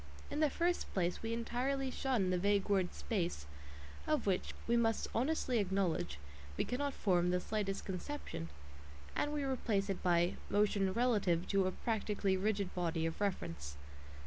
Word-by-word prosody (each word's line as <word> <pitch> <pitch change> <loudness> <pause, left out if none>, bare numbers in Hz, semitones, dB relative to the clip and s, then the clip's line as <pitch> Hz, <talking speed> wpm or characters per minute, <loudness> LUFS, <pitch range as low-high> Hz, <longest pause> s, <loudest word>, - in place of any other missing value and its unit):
In 290 - -1
the 305 -1 +4
first 345 +5 0
place 180 -2 0
we 225 - -3
entirely 255 +3 -1
shun 245 -9 +1
the 180 - +2
vague 200 +1 +2
word 190 -3 +2
"space," 175 - -2 0.6
of 305 -5 +1
which, 190 -3 0
we 235 - +2
must 225 -2 +2
honestly 255 -1 +1
acknowledge, 190 - 0 0.4
we - - +1
cannot 280 +3 -1
form 180 -3 +2
the 180 0 +2
slightest 195 0 -2
conception, 190 - -5 0.7
and 290 - +1
we 295 -1 -1
replace 220 -7 0
it 190 - -3
by 175 0 +3
"motion 205 -2 +3
relative 205 -7 +2
to 195 -1 +3
a - - 0
practically 205 -3 0
rigid 200 0 0
body 165 -2 0
of 165 +4 -3
reference." 80 - -2
200 Hz, 155 wpm, -36 LUFS, 180-240 Hz, 0.7 s, the